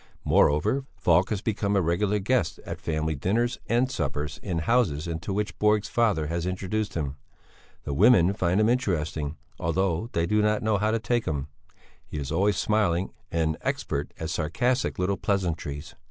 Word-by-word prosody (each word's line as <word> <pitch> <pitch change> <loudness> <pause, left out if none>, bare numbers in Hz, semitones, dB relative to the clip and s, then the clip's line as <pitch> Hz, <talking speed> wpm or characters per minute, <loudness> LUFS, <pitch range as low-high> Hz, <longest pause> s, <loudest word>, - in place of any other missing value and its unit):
Moreover, 130 - +3
Falk 90 +2 +3
has 105 -2 -2
become 100 -2 0
a 100 - +4
regular 95 +5 +1
guest 100 -5 0
at - - -6
family 80 0 -1
dinners 110 - 0
and 125 +3 +2
suppers 75 - -3
in 90 -5 -3
houses 85 -5 +1
into 80 +2 -4
which 105 +2 -2
Borg's 105 -1 +2
father 105 -10 +2
has 85 +3 -2
introduced 100 +3 -2
him. 70 -4 -3 0.7
The 70 - -3
women 95 - +5
find 95 -1 +1
him 110 - +4
interesting, 80 - -1 0.2
although 90 +4 0
they 85 - +1
do 105 +4 +2
not 105 0 +1
know 110 -2 +2
how 105 +2 +1
to 115 - +2
take 120 +1 0
him; 75 -2 -2 0.5
he - - -7
is 70 -1 -4
always 95 +4 +2
smiling 100 -4 +1 0.2
and 80 -1 0
expert 70 +1 -2
at 80 0 -3
sarcastic 120 - 0
little 95 +2 0
pleasantries. 85 -6 -2
95 Hz, 170 wpm, -26 LUFS, 80-105 Hz, 0.7 s, women